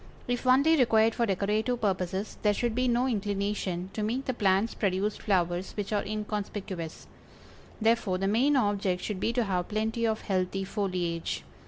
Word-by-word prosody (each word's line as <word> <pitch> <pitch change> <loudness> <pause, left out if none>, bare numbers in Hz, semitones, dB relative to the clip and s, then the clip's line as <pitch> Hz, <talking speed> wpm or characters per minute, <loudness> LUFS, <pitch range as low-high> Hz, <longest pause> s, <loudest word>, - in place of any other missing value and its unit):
If 245 +1 -2
only 280 +6 +5
required 225 -3 +4
for 235 0 0
decorative 210 +5 0
purposes 190 -1 -2
there 210 -1 +3
should 240 +1 0
be 255 +2 +1
no 245 +1 +2
inclination 200 -4 -2
to 215 - -3
make 240 +6 -1
the 260 - -1
plants 200 0 +2
produce 200 +1 0
flowers 180 -2 0
which 205 0 -3
are 205 - +1
inconspicuous; 205 -5 -4 0.7
therefore 220 -4 +2
the 195 +1 -1
main 250 +8 +3
object 200 -6 +1
should 210 -3 -3
be 225 - +1
to 240 0 +2
have 180 -4 -1
plenty 220 +2 0
of 220 0 -1
healthy 190 0 -1
foliage. 180 -4 -2
210 Hz, 165 wpm, -28 LUFS, 190-230 Hz, 0.7 s, only